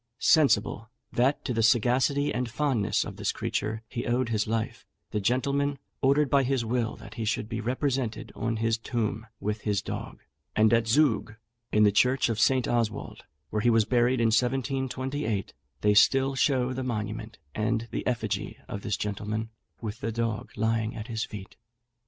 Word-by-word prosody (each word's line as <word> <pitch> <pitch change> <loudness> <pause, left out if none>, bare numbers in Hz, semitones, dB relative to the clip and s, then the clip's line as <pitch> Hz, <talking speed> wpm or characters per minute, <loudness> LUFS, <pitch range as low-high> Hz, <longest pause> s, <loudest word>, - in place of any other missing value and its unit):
Sensible 140 -8 +3 0.2
that 130 +4 +1
to 125 - -1
the 115 - +1
sagacity 130 +5 +3
and 125 +1 -1
fondness 115 -6 +1
of - - -8
this - - 0
creature 110 +1 -3
he 120 - -4
owed 120 0 +1
his 110 -1 0
life, 110 0 -2 0.3
the 105 - 0
gentleman 140 +6 +1 0.2
ordered 140 +2 +4
by 140 +1 +4
his 130 -2 0
will 115 -1 -1
that - - -12
he 115 - -4
should 110 0 -1
be 115 0 -3
represented 130 -1 -2
on 115 0 -2
his 115 0 +1
tomb 115 -1 -2
with 105 +1 -2
his 105 -2 0
dog; 100 - -6 0.3
and 110 +1 +4
at 115 -1 +3
Zug, 115 -4 +2 0.4
in 105 - +4
the 105 - +6
church 125 +5 +3
of 110 -2 -1
St. 130 +2 +3
Oswald, 115 -3 -2 0.3
where 105 - 0
he 120 - +3
was 115 -2 +4
buried 125 +1 +2
in 115 -1 +3
1728, 130 -2 -1 0.3
they 105 0 +4
still 135 +6 +5
show 130 -2 +2
the 130 - -3
monument 110 -2 -4 0.2
and 110 +2 -1
the - - -3
effigy 125 -2 -2
of 100 - -5
this 105 -1 -1
gentleman, 105 +2 -3 0.3
with 110 -1 -5
the 115 - -2
dog 115 -1 -2
lying 110 0 0
at 110 +3 -7
his 110 -1 -2
feet. 100 -3 -10
115 Hz, 175 wpm, -28 LUFS, 110-130 Hz, 0.4 s, the